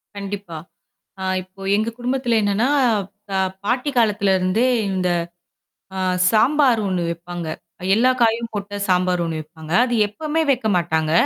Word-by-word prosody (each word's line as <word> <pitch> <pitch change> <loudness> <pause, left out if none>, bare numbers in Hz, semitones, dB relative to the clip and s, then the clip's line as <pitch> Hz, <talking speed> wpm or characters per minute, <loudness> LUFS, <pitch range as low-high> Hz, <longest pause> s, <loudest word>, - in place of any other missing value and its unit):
கண்டிப்பா. 200 -4 -6 0.6
ஆ - - -3 0.2
இப்போ 185 +1 -16
எங்க 215 +2 0
குடும்பத்துல 250 -1 -1
என்னன்னா, 205 +4 +1 0.7
அ - - +2 0.3
பாட்டி 250 +6 0
காலத்துல 205 -3 +2
இருந்தே 185 +7 +1 0.2
இந்த 185 -1 0 0.9
அ - - -3 0.3
சாம்பார் 255 +2 +4
ஒண்ணு 185 -2 -1
வைப்பாங்க. 170 0 -6 0.3
அ - - -9
எல்லா 250 +4 +4
காயும் 230 0 +2
போட்ட 205 0 -5
சாம்பார் 180 -1 +2
ஒண்ணு 160 -1 -3
வைப்பாங்க. 155 +1 -12
அது 245 - -3
எப்பமே 305 +9 -2
வைக்கமாட்டாங்க. 175 - 0
205 Hz, 135 wpm, -21 LUFS, 180-235 Hz, 0.9 s, சாம்பார்